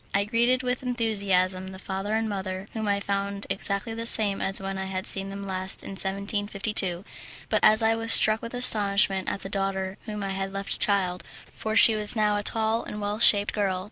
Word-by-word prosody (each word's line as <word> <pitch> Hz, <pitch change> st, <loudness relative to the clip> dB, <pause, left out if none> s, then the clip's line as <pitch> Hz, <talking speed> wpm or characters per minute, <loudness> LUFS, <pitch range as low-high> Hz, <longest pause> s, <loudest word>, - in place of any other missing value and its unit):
I 200 Hz, -, +2 dB
greeted 240 Hz, +4 st, 0 dB
with 250 Hz, 0 st, -3 dB
enthusiasm 200 Hz, -7 st, 0 dB
the 190 Hz, 0 st, -10 dB
father 195 Hz, +2 st, -5 dB
and 225 Hz, 0 st, -1 dB
mother, 190 Hz, -1 st, -6 dB
whom 220 Hz, -2 st, -4 dB
I 200 Hz, 0 st, 0 dB
found 200 Hz, 0 st, -4 dB
exactly 200 Hz, +3 st, -2 dB
the 230 Hz, +1 st, -5 dB
same 205 Hz, -4 st, +3 dB
as 195 Hz, -, +4 dB
when 195 Hz, 0 st, -6 dB
I 190 Hz, -, -4 dB
had 190 Hz, 0 st, -5 dB
seen 195 Hz, 0 st, +1 dB
them 200 Hz, 0 st, -8 dB
last 190 Hz, -1 st, -1 dB
in -, -, -8 dB
1752, 200 Hz, -1 st, -2 dB, 0.4 s
but -, -, -1 dB
I 225 Hz, +1 st, +3 dB
was 225 Hz, 0 st, +1 dB
struck 215 Hz, 0 st, +6 dB
with 230 Hz, +1 st, -8 dB
astonishment 200 Hz, -5 st, +2 dB
at 200 Hz, -, -5 dB
the -, -, -6 dB
daughter 195 Hz, -1 st, -4 dB
whom 210 Hz, -1 st, -6 dB
I 195 Hz, -, -4 dB
had 195 Hz, 0 st, -5 dB
left 195 Hz, 0 st, -5 dB
a -, -, -6 dB
child, 185 Hz, -3 st, -1 dB, 0.3 s
for 220 Hz, 0 st, -5 dB
she 225 Hz, -, +7 dB
was 210 Hz, +1 st, -1 dB
now 210 Hz, -1 st, +1 dB
a 205 Hz, -, -2 dB
tall 220 Hz, +2 st, 0 dB
and 210 Hz, -, -8 dB
well 205 Hz, +1 st, -4 dB
shaped 205 Hz, -3 st, +6 dB
girl. 195 Hz, -3 st, -2 dB
200 Hz, 205 wpm, -25 LUFS, 195-220 Hz, 0.4 s, she